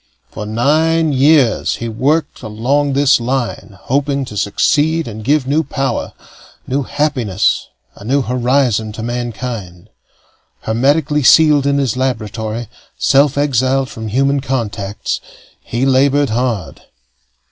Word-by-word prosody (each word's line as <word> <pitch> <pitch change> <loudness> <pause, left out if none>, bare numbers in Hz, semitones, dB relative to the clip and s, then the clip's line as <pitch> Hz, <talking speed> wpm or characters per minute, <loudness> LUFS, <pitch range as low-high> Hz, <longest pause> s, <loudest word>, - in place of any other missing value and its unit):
For 105 - -6
nine 155 +7 +1
years 135 -3 +3
he 115 - -5
worked 140 +7 -1
along 130 +6 -1
this 140 -1 +4
line, 120 -5 -3
hoping 140 +1 -1
to 105 - -10
succeed 150 +10 +1
and 110 -1 -7
give 145 +3 +1
new 145 +4 +1
power, 135 -2 -3 0.5
new 135 +2 -1
happiness, 130 -9 0 0.3
a - - -14
new 135 +5 +1
horizon 125 -3 0
to 110 - -6
mankind. 115 -5 -5 0.7
Hermetically 145 +6 +1
sealed 150 0 +5
in 140 0 +2
his 135 -5 0
laboratory, 115 -3 -3 0.3
self 140 +1 +3
exiled 135 -1 +1
from 110 -3 -7
human 135 +5 +1
contacts, 110 -7 -3 0.4
he 120 +3 -2
labored 140 0 +2
hard. 110 - -2
130 Hz, 120 wpm, -16 LUFS, 110-140 Hz, 0.7 s, sealed